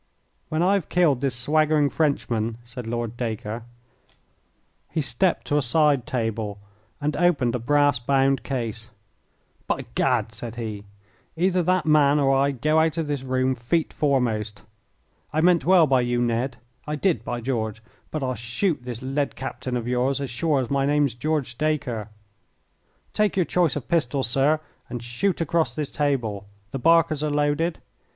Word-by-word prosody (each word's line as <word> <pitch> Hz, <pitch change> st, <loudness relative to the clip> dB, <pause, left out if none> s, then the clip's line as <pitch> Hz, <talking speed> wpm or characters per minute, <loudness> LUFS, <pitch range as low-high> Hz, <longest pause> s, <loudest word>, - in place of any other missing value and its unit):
"When 155 Hz, +2 st, 0 dB
I've 195 Hz, -2 st, +2 dB
killed 155 Hz, -8 st, +3 dB
this 135 Hz, -3 st, 0 dB
swaggering 150 Hz, +4 st, +2 dB
Frenchman," 115 Hz, -7 st, 0 dB
said 120 Hz, 0 st, -8 dB
Lord 120 Hz, 0 st, -3 dB
Dacre. 115 Hz, -1 st, -3 dB, 1.3 s
He -, -, -2 dB
stepped 155 Hz, +6 st, 0 dB
to 145 Hz, -, +1 dB
a -, -, +1 dB
side 145 Hz, 0 st, +2 dB
table 110 Hz, -4 st, -2 dB, 0.4 s
and 150 Hz, 0 st, -1 dB
opened 145 Hz, -9 st, +2 dB
a 125 Hz, -, -1 dB
brass 145 Hz, +1 st, +3 dB
bound 135 Hz, +2 st, +2 dB
case. 115 Hz, -4 st, -4 dB, 0.8 s
"By -, -, -1 dB
Gad," 120 Hz, -5 st, +1 dB
said 115 Hz, +1 st, -7 dB
he, 110 Hz, -3 st, -5 dB, 0.5 s
"either 180 Hz, +1 st, +2 dB
that 180 Hz, +1 st, +1 dB
man 150 Hz, -2 st, +4 dB
or 135 Hz, -1 st, +3 dB
I 135 Hz, +1 st, +3 dB
go 150 Hz, +4 st, +1 dB
out 160 Hz, 0 st, +2 dB
of 165 Hz, -, 0 dB
this 145 Hz, -2 st, -2 dB
room 130 Hz, 0 st, 0 dB
feet 130 Hz, +7 st, -1 dB
foremost. 115 Hz, -7 st, 0 dB, 0.7 s
I 155 Hz, -, 0 dB
meant 175 Hz, +1 st, +4 dB
well 180 Hz, -2 st, +6 dB
by 130 Hz, -3 st, +3 dB
you, 120 Hz, 0 st, 0 dB
Ned; 120 Hz, +2 st, 0 dB, 0.3 s
I 150 Hz, -, -1 dB
did, 175 Hz, +3 st, +1 dB
by 120 Hz, -, -3 dB
George, 110 Hz, -3 st, -3 dB, 0.3 s
but 155 Hz, -3 st, -3 dB
I'll 130 Hz, -1 st, 0 dB
shoot 125 Hz, -, -1 dB
this 125 Hz, -1 st, -7 dB
led 140 Hz, +2 st, -1 dB
captain 130 Hz, -1 st, -4 dB
of 120 Hz, -1 st, -4 dB
yours 125 Hz, +3 st, +1 dB
as 140 Hz, -4 st, -4 dB
sure 145 Hz, +4 st, +1 dB
as 130 Hz, -1 st, -3 dB
my 140 Hz, 0 st, +2 dB
name's 145 Hz, -3 st, +2 dB
George 135 Hz, -1 st, -2 dB
Dacre. 130 Hz, -8 st, -1 dB, 1.0 s
Take 210 Hz, -1 st, +1 dB
your 185 Hz, -3 st, +2 dB
choice 175 Hz, -5 st, +1 dB
of 145 Hz, -, -5 dB
pistols, 140 Hz, -7 st, +1 dB
sir, 140 Hz, +6 st, +2 dB, 0.3 s
and 120 Hz, -1 st, -5 dB
shoot 145 Hz, +11 st, -1 dB
across 165 Hz, -7 st, 0 dB
this 150 Hz, -2 st, -3 dB
table. 120 Hz, -9 st, -1 dB, 0.2 s
The 135 Hz, -, -3 dB
barkers 165 Hz, 0 st, +4 dB
are 150 Hz, -, 0 dB
loaded. 150 Hz, +3 st, +1 dB
135 Hz, 165 wpm, -24 LUFS, 120-155 Hz, 1.3 s, well